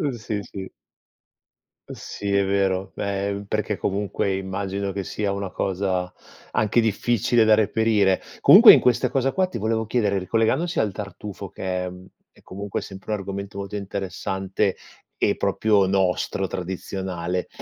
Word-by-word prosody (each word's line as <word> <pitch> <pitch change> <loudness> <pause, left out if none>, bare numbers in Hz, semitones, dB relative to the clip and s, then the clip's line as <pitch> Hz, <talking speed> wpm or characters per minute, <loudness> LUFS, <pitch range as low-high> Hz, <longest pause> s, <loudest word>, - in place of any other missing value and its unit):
Uhm, 145 -5 0
sì, 105 -1 -3
sì. 95 -1 -8 1.2
Uhm, - - -7
sì, 100 -1 -5
è 100 -1 +3
vero. 95 -1 0
Eh, 100 0 -2
perché 105 -1 -1
comunque 100 -1 -1
immagino 95 +1 -3
che 100 0 -4
sia 105 0 -2
una 100 -1 -3
cosa 95 -1 -1 0.4
anche 110 +2 +2
difficile 115 +2 +2
da 110 -1 +6
reperire. 105 -3 +2 0.2
Comunque - - +10
in - - +6
questa 125 +1 +2
cosa 135 +1 +1
qua 185 -1 +1
ti 185 - -6
volevo 110 +1 -1
chiedere, 105 -4 +1
ricollegandosi 115 - 0
al 105 -2 +1
tartufo 100 0 -7
che 90 0 -3
è, - - -4
mhmm, 90 +1 -12 0.3
è - - -23
comunque 100 +1 -5
sempre 95 +2 -8
un 105 - +1
argomento 100 +1 -6
molto 100 +1 -5
interessante 95 0 -2 0.5
e - - +3
proprio 105 -3 +2
nostro 95 0 0
tradizionale, 90 -1 -4
100 Hz, 150 wpm, -23 LUFS, 95-110 Hz, 1.2 s, Comunque